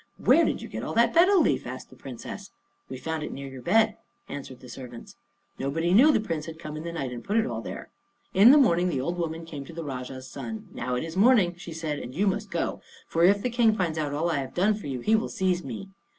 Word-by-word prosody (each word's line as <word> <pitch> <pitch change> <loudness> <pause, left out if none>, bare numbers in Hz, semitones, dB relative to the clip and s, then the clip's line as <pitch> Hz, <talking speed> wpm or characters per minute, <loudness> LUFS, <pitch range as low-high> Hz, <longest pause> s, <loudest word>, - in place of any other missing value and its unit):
"Where - - +5
did - - -1
you - - -6
get - - -6
all - - -4
that 235 0 +4
betel 370 +3 +6
leaf?" 310 - +1
asked 125 +1 -8
the - - -14
Princess. 125 -2 -8 0.4
"We 130 - -6
found 160 +4 -3
it 150 - -4
near 140 0 -6
your 135 -1 -9
bed," 220 - +3 0.3
answered 135 -3 -8
the 125 - -13
servants. 125 -1 -10 0.4
Nobody 165 +6 0
knew 270 +10 +7
the - - +3
Prince 165 -8 -3
had 160 -1 -7
come 155 -2 -7
in 155 - -5
the 170 +1 -5
night 140 -7 -4
and 120 -1 -7
put 205 +3 0
it 225 - +3
all 115 -2 -3
there. - - -8 0.4
In 200 +5 +8
the 285 - +8
morning 180 - +4
the 140 - -1
old 170 +7 -2
woman 165 0 -3
came 150 -4 -7
to 165 - -11
the 165 0 -5
Rajah's 130 -2 -6
son. 220 -2 -7
"Now 125 - -2
it 125 - -2
is 165 +1 -6
morning," 205 -4 +5
she 175 -1 -9
said, 155 -2 -3
"and 125 +2 -8
you 195 +5 +1
must 205 +1 -1
go; 170 -2 -2 0.3
for 165 - +1
if 200 +3 +5
the 250 - 0
King 230 -2 +3
finds 165 -5 -1
out 150 -2 -1
all 160 +4 0
I 145 - 0
have 135 -1 -6
done 195 +4 +3
for 205 -7 -6
you, 130 -3 -4
he 220 - +3
will 220 - 0
seize 180 -2 0
me." 135 - -7
165 Hz, 265 wpm, -27 LUFS, 135-205 Hz, 0.4 s, In